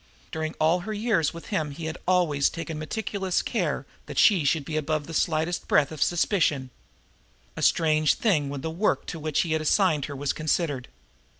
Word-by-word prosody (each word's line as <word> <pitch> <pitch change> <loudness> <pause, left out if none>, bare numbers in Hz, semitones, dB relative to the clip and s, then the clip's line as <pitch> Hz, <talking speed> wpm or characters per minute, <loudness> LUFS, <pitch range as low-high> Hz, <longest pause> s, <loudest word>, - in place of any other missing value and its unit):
During 160 0 -3
all 160 +3 +3
her 215 +5 -5
years 210 -7 +1
with 170 - -10
him 155 -6 0
he 155 +3 -7
had 160 +2 -5
always 170 -6 +3
taken 165 -2 -6
meticulous 190 +2 -2
care - - -1 0.2
that - - -8
she 195 -7 +5
should 145 +1 +1
be 155 - -4
above 155 -1 -1
the 165 - -8
slightest 160 +2 0
breath 145 -1 +3
of 155 -3 -8
suspicion 160 -7 +1 0.8
a - - -5
strange 155 -2 +3
thing 155 -11 +1
when 140 -1 -5
the 160 - -3
work 185 +6 0
to 165 - -6
which 155 -1 0
he 165 - -3
had 160 0 +1
assigned 155 -3 +2
her 145 - -7
was 140 0 -1
considered. 155 -4 -1
160 Hz, 190 wpm, -26 LUFS, 150-175 Hz, 0.8 s, she